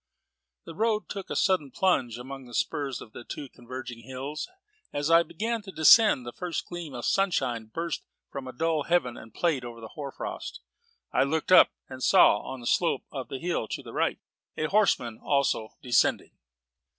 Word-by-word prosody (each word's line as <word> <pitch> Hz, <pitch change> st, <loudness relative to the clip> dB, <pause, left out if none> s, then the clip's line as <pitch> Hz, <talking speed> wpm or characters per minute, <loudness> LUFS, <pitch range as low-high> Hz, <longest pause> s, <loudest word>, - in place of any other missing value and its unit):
The -, -, -8 dB
road 215 Hz, +3 st, 0 dB
took 195 Hz, -2 st, -6 dB
a -, -, -3 dB
sudden 185 Hz, -8 st, +2 dB
plunge 130 Hz, -, +1 dB
among 135 Hz, +2 st, -8 dB
the 120 Hz, -1 st, -9 dB
spurs 140 Hz, -3 st, -1 dB
of 110 Hz, -, -13 dB
two 145 Hz, -, -6 dB
converging 125 Hz, -1 st, -8 dB
hills. 130 Hz, -, -6 dB, 0.4 s
As 145 Hz, +2 st, -1 dB
I 165 Hz, 0 st, +8 dB
began 225 Hz, +6 st, -3 dB
to 200 Hz, -2 st, -10 dB
descend, 160 Hz, -, +6 dB
the 120 Hz, -, -5 dB
first 175 Hz, -3 st, -4 dB
gleam 170 Hz, -6 st, -7 dB
of 120 Hz, -, -5 dB
sunshine 130 Hz, -, +1 dB
burst 165 Hz, +9 st, -4 dB, 0.3 s
from 140 Hz, -1 st, -6 dB
the 130 Hz, -, -6 dB
dull 160 Hz, +4 st, 0 dB
heaven 170 Hz, -9 st, +1 dB
and 110 Hz, -, -11 dB
played 150 Hz, -1 st, 0 dB
over 120 Hz, -1 st, -8 dB
the 110 Hz, -1 st, -9 dB
hoar 140 Hz, -2 st, -6 dB
frost. -, -, -6 dB, 0.5 s
I -, -, +3 dB
looked 155 Hz, +5 st, 0 dB
up, 185 Hz, -, +9 dB, 0.2 s
and 130 Hz, -1 st, -9 dB
saw, 105 Hz, -, +6 dB
on 130 Hz, +3 st, -7 dB
the -, -, -10 dB
slope 170 Hz, +7 st, +1 dB
of 130 Hz, -4 st, -5 dB
the 135 Hz, -, -5 dB
hill 170 Hz, -6 st, -2 dB
to -, -, -5 dB
the -, -, -10 dB
right, -, -, +1 dB, 0.4 s
a -, -, -1 dB
horseman 130 Hz, -, +2 dB
also 140 Hz, -6 st, +1 dB
descending. 125 Hz, -2 st, +2 dB
140 Hz, 185 wpm, -28 LUFS, 125-170 Hz, 0.5 s, up